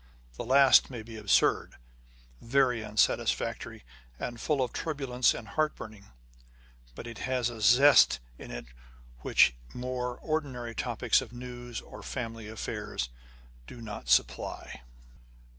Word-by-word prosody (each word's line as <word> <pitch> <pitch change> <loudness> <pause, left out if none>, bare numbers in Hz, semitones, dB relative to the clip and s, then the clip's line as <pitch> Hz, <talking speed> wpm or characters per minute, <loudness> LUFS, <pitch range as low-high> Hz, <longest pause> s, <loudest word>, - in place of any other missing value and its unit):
The - - -5
last 135 +2 +6
may 120 -4 -7
be 115 0 -10
absurd, 105 -2 +2 0.7
very 125 -2 +2
unsatisfactory, 105 - 0 0.3
and 120 - -5
full 145 -4 +1
of 125 - -4
turbulence 135 -5 0
and 110 - -8
heartburnings; 110 -10 -3 0.9
but - - -8
it 115 -2 -8
has 125 -2 -1
a 115 -2 -9
zest 125 - +6 0.2
in - - -10
it - - -7 0.5
which 60 - +4 0.2
more 125 0 -3
ordinary 135 -7 -3
topics - - +1
of - - -10
news 120 -1 -7
or - - -12
family 115 -4 -5
affairs 105 - -4 0.6
do 120 - -10
not 105 - -8
supply. 60 - 0
120 Hz, 125 wpm, -29 LUFS, 110-130 Hz, 0.9 s, last